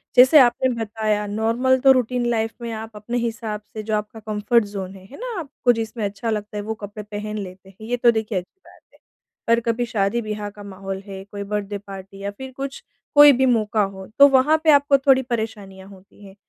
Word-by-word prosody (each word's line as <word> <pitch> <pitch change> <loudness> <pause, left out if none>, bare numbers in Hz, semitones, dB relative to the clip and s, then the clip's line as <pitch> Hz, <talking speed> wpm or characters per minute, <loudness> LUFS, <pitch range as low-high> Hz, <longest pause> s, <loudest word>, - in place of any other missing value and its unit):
जैसे 260 +5 +8
आपने 255 0 +4
बताया 215 -1 -1
नॉर्मल 230 +5 +1
तो 270 - +8
रूटीन 250 -1 +1
लाइफ़ 225 -1 0
में 235 -1 -4
आप 220 +1 -7
अपने 225 +4 -4
हिसाब 225 -2 -3
से 215 -1 -5
जो 215 0 -1
आपका 210 +1 -4
कम्फर्ट 215 +2 +1
ज़ोन 195 -2 -6
है, 190 - -14
है 260 +8 -13
ना? 475 -4 -5
आपको 270 -5 0
जिसमें 225 0 -4
अच्छा 200 +3 -4
लगता 210 -1 -3
है 205 - -3
वो 220 +2 -3
कपड़े 205 +1 -7
पहन 210 +1 -6
लेते 190 -1 -8
हैं, 215 +3 -12
ये 245 +1 -1
तो 240 0 +5
देखिए 220 -3 -2
अच्छी 185 - -7
बात - - -18
है। - - -24 0.5
पर 230 0 +4
कभी 235 +1 -1
शादी-ब्याह 210 -1 -2
का 205 0 -13
माहौल 195 -1 -6
है, 195 -1 -8
कोई 200 0 -7
बर्थडे 205 0 -3
पार्टी 195 -1 -11
या 200 - -3
फिर 265 +5 -9
कुछ 275 0 -6 0.3
कोई 290 0 +10
भी 265 - +4
मौका 220 -3 +2
हो, 195 -1 -6
तो 280 - +10
वहाँ 280 +3 +4
पे 315 - +6
आपको 285 -1 +5
थोड़ी 265 -1 +4
परेशानियाँ 210 -6 -5
होती 195 +1 -17
हैं। 195 0 -14
220 Hz, 215 wpm, -22 LUFS, 205-245 Hz, 0.5 s, कोई